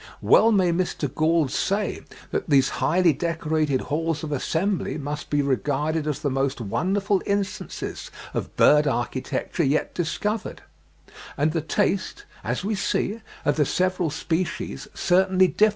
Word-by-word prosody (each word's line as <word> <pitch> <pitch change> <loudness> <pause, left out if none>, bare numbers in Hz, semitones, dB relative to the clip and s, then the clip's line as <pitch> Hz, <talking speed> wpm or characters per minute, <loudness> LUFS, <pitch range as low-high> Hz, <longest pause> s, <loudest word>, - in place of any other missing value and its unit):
Well 225 - +6
may 185 -5 +3
Mr. 170 -6 -1
Gould 155 -3 +2
say 200 +1 -1 0.3
that - - -2
"these 135 -2 +4
highly 175 -1 +4
decorated 155 -5 0
halls 160 +1 -2
of 155 - -4
assembly 165 +7 -1
must 145 0 -5
be 145 -1 +2
regarded 145 +3 0
as 150 -1 -2
the 145 - 0
most 135 0 0
wonderful 195 - 0
instances 200 -1 -3 0.2
of - - -4
bird 150 0 +6
architecture 130 +6 -2
yet 145 +2 +1
discovered;" 210 +5 -3 0.7
and 150 +2 +2
the 165 0 -1
taste, 195 - -1 0.2
as - - -2
we 215 - 0
see, 210 +2 -1 0.2
of 145 +1 +2
the 150 - +3
several 185 -2 0
species 165 +4 -3
certainly 185 +1 +3
differs. 215 +4 +4
160 Hz, 140 wpm, -24 LUFS, 145-185 Hz, 0.7 s, Well